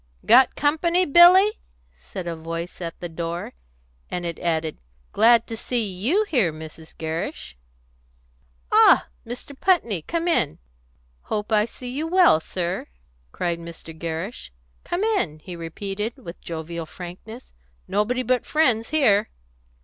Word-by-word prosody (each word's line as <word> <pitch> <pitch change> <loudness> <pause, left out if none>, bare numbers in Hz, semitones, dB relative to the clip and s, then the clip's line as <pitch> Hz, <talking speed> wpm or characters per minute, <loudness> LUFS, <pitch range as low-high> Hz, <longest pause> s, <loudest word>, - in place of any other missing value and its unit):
"Got 255 +4 +6
company, 335 +5 +2
Billy?" 365 +7 +7 0.4
asked - - -26
a 175 -3 -3
voice 165 +2 -6
at 165 -1 -6
the 175 - -5
door; 170 +1 -5 0.6
and 180 -1 -4
it 170 -2 -4
added, 160 -2 -1 0.3
"Glad 230 +1 +5
to 230 - -6
see 235 0 -1
you 215 - +1
here, 245 - +1
Mrs. 160 +1 -11
Gerrish." 160 - -4 1.2
"Ah, - - +6 0.2
Mr. 250 +4 -8
Putney! 265 - +1
Come 335 - -3
in. 325 - +1 0.7
Hope 210 +1 -3
I 210 -1 +4
see 245 +1 -9
you 300 +5 -3
well, 355 - +5
sir!" 175 +2 -4 0.4
cried 170 -1 -2
Mr. 165 -1 -10
Gerrish. 165 - -5 0.3
"Come 350 +3 -2
in!" 390 - 0
he 175 +3 -9
repeated, 195 - -5
with 180 -10 -10
jovial 165 0 -6
frankness. 185 +9 -10 0.3
"Nobody 225 +6 0
but 250 0 +1
friends 245 -8 +2
here." 220 -9 +3
205 Hz, 135 wpm, -23 LUFS, 170-260 Hz, 1.2 s, Billy